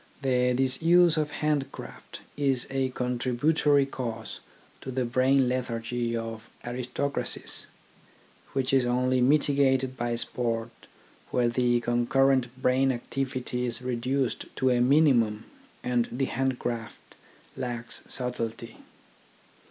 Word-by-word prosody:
The 125 -1 +2
disuse 165 +6 +4
of 155 -2 0
hand 150 -2 -1
craft - - -10
is 135 -4 +1
a 135 -1 0
contributory 130 +4 +2
cause 115 -4 -5 0.4
to - - -7
the 130 -1 -1
brain 130 +2 +3
lethargy 120 -1 -2
of 115 -1 -6 0.2
aristocracies, 125 +3 -3 0.9
which 135 -1 0
is 135 -2 +5
only 125 +1 +1
mitigated 135 -1 +3
by 120 -1 -1
sport 115 -1 -2 0.6
where 120 -1 +2
the 120 0 +2
concurrent 130 +2 +2
brain 130 +1 +3
activity 125 0 -3
is 120 +1 -4
reduced 125 0 -1
to 130 -1 +2
a 120 -1 +2
minimum 125 -6 +4 0.4
and 120 -1 +1
the 135 +2 0
hand 130 0 -1
craft 115 -3 -5 0.4
lacks 120 -2 -4
subtlety. 115 -2 -4
125 Hz, 115 wpm, -27 LUFS, 120-135 Hz, 0.9 s, is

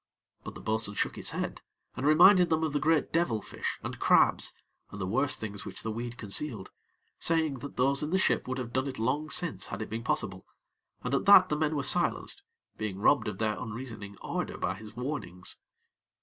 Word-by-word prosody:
But - - -8
the - - -9
bo'sun 110 -1 0
shook - - -1
his - - 0
head, - - -4 0.3
and 135 - -1
reminded 180 +4 +7
them 160 0 +1
of 155 -3 -1
the 145 - +1
great 160 0 +1
devil 165 -10 +1
fish - - -5
and - - -6
crabs, - - +3 0.4
and 100 - -9
the 95 - -2
worse 130 +9 +2
things 105 -2 -6
which - - -7
the 110 - -2
weed 120 +2 -5
concealed, 110 -1 -3 0.5
saying 160 -5 +1
that 140 +3 -9
those 135 +2 +2
in 150 - -2
the 185 - +2
ship 190 - +1
would 130 +1 -3
have 120 -2 -5
done 130 +2 0
it 130 - -5
long 140 +7 -1
since 170 -2 +1
had - - -6
it 110 - -6
been 115 +1 -4
possible, 95 -5 -2 0.6
and 125 - -3
at 140 - +1
that 190 -2 +8
the 150 - +1
men 155 0 0
were 140 - -1
silenced, 175 - +4 0.4
being 105 -3 -3
robbed 115 +5 +3
of 105 -2 -4
their 110 0 0
unreasoning 110 -4 -7
ardor - - -3
by - - -1
his 110 0 -12
warnings. 125 -9 -4
130 Hz, 205 wpm, -29 LUFS, 110-150 Hz, 0.6 s, that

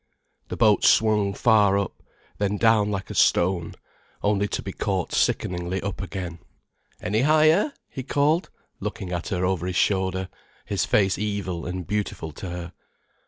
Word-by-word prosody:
The - - -6
boat 105 -3 +4
swung 105 -3 +3
far 105 -4 +4
up, 100 -1 -3 0.4
then 100 0 0
down 110 -2 +4
like 95 -2 -4
a - - -4
stone, 85 -1 +2 0.5
only 100 0 +2
to - - -4
be 95 - -6
caught 95 -4 -2
sickeningly 90 +1 0
up 100 0 -4
again. 90 -3 -5 0.6
"Any 110 +2 0
higher?" 155 - +4 0.2
he 130 - -6
called, 145 +6 +1 0.3
looking 90 - -5
at 85 -1 -3
her 90 -3 -1
over 90 -1 -1
his 90 - -3
shoulder, 95 -1 +1 0.4
his - - -1
face 95 -2 +2
evil 100 -5 -3
and 90 0 -4
beautiful 100 -5 -3
to 90 +5 -7
her. 90 0 -6
100 Hz, 155 wpm, -24 LUFS, 90-105 Hz, 0.6 s, boat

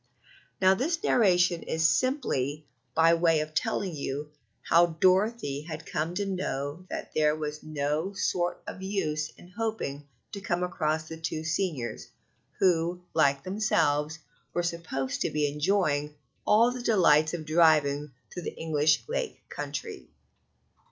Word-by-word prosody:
Now, 190 0 +6
this 320 - -1
narration 180 -6 +3
is 160 0 +1
simply 155 - 0 0.3
by 165 +1 +5
way 165 -1 +3
of 155 0 -6
telling 180 +2 -1
you 145 +1 -4 0.3
how 170 +1 +5
Dorothy 185 -6 +2
had 160 0 -7
come 160 +3 -2
to 200 +2 -1
know 175 -3 -3
that - - -5
there 150 -1 +3
was 150 -1 -5
no 155 +4 -2
sort 175 -2 -1
of 190 - -7
use 155 -6 -1
in 175 - -15
hoping 200 -9 -4 0.2
to 200 - -6
come 180 -2 -1
across 155 -3 -1
the 160 - -7
two 160 -1 -3
seniors, 160 -6 -2 0.5
who, 175 -1 +2
like 140 -3 +3
themselves, 160 -6 +1 0.4
were 175 - +1
supposed 165 -6 -3
to - - +1
be 150 -1 +1
enjoying 150 -1 0 0.3
all 230 +3 +5
the 250 0 -5
delights 170 -8 +4
of 160 -2 -6
driving 150 -3 +3 0.2
through 180 - -5
the - - -6
English 155 -1 +2
Lake - - -4
Country. - - -6
160 Hz, 140 wpm, -28 LUFS, 150-185 Hz, 0.5 s, Now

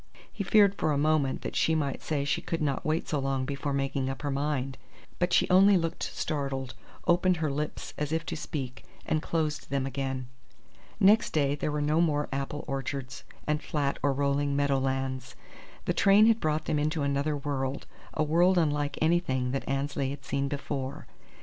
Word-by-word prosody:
He 205 - -3
feared 200 0 +5
for 155 - +2
a 145 - +1
moment 150 -2 +1
that - - -4
she 160 - +3
might 140 -3 -1
say 145 -3 -1
she 145 - 0
could 165 - -3
not 140 -3 -1
wait 160 0 0
so 150 - 0
long 135 -1 -1
before 140 +1 -3
making 135 -1 -1
up 135 +2 -5
her 145 - -1
mind; 135 -1 -1 0.4
but 175 0 +1
she - - +4
only 195 +2 +7
looked 165 0 -2
startled, 135 -4 -3 0.3
opened 180 +1 +3
her 155 -2 -1
lips 150 +2 -4
as 150 0 -2
if 160 0 -1
to - - -3
speak, 135 -5 -5 0.2
and 155 - 0
closed 155 -2 -2
them 135 -1 0
again. 135 -1 -3 0.7
Next 210 +4 +5
day 140 -2 +2
there 145 +1 -2
were 150 0 -1
no 155 +3 +2
more 150 -3 +1
apple 140 +2 -3
orchards 135 -1 -4 0.2
and 150 0 0
flat 140 -2 -1
or 140 - +2
rolling 140 +1 0
meadow 140 -1 +2
lands. 130 -1 -2 0.5
The - - +1
train 200 +2 +6
had 225 0 +4
brought 155 -2 0
them 150 - 0
into 155 0 0
another 140 +1 0
world, 140 -1 -3 0.3
a 155 - +2
world 175 +5 +4
unlike 145 -3 +1
anything 135 -7 +1
that 135 0 -3
Annesley 135 0 -1
had 140 -1 -7
seen 140 0 -1
before. 140 0 -4
145 Hz, 190 wpm, -29 LUFS, 135-155 Hz, 0.7 s, only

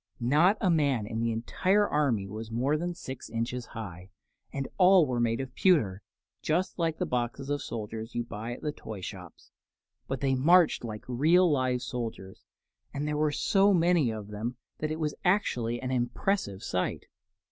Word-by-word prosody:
Not 150 - +4
a 190 -4 +2
man 140 -9 +2
in 110 +1 -4
the 115 0 0
entire 185 - +1
army 130 -10 +1
was 110 +3 -7
more 125 +6 +1
than 175 +3 -2
six 130 -7 -8
inches 120 +2 -3
high, 95 -4 -8 0.4
and 135 -1 -3
all 185 -2 +7
were 125 -3 -1
made 115 -1 +1
of 130 -1 -5
pewter 115 - +2 0.4
just 180 +4 -1
like 165 -2 0
the - - -1
boxes 125 +3 -2
of 145 - -1
soldiers 110 +1 -6
you 120 - 0
buy 115 0 -6
at - - -10
the 150 - -1
toy 110 -8 -8
shops; 90 -2 -9 0.6
but 135 - -3
they 135 0 +1
marched 165 +5 +4
like 110 -2 -6
real 160 +8 +4
live 130 -3 +1
soldiers, 115 -6 -6 0.5
and 145 +1 -3
there 150 - -1
were 150 0 +2
so 195 +5 +3
many 170 -6 +3
of 105 -2 -6
them 110 +4 -4 0.2
that 155 - -1
it 155 +1 -3
was 150 -2 -1
actually 125 - +1
an 130 +1 -4
impressive 120 - -1
sight. 90 - -2
130 Hz, 180 wpm, -29 LUFS, 115-155 Hz, 0.6 s, all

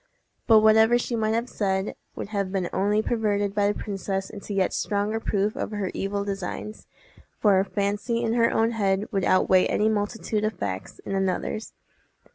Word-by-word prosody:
But 220 -2 +7
whatever 220 +2 +6
she 240 0 -2
might 220 -1 +1
have 235 +2 -1
said 190 -3 -1 0.2
would - - -6
have 200 -3 -2
been 190 -3 -2
only 205 +3 +1
perverted 205 -4 0
by 205 -1 +2
the - - -6
princess 195 -2 -3
into 205 0 -9
yet 195 -2 +1
stronger 210 +2 -1
proof 210 -1 0
of - - -3
her 205 -3 -3
evil 200 +1 -2
designs, 200 +2 -5 0.5
for 200 -3 +4
a - - +3
fancy 205 +4 -1
in 225 -1 0
her 230 -1 +3
own 225 +1 +2
head 200 -3 0
would 195 -2 0
outweigh 185 0 +4
any 215 +1 +2
multitude 215 0 -1
of 215 +1 0
facts 95 -2 -4
in - - -4
another's. 195 +3 -2
205 Hz, 180 wpm, -25 LUFS, 195-220 Hz, 0.5 s, But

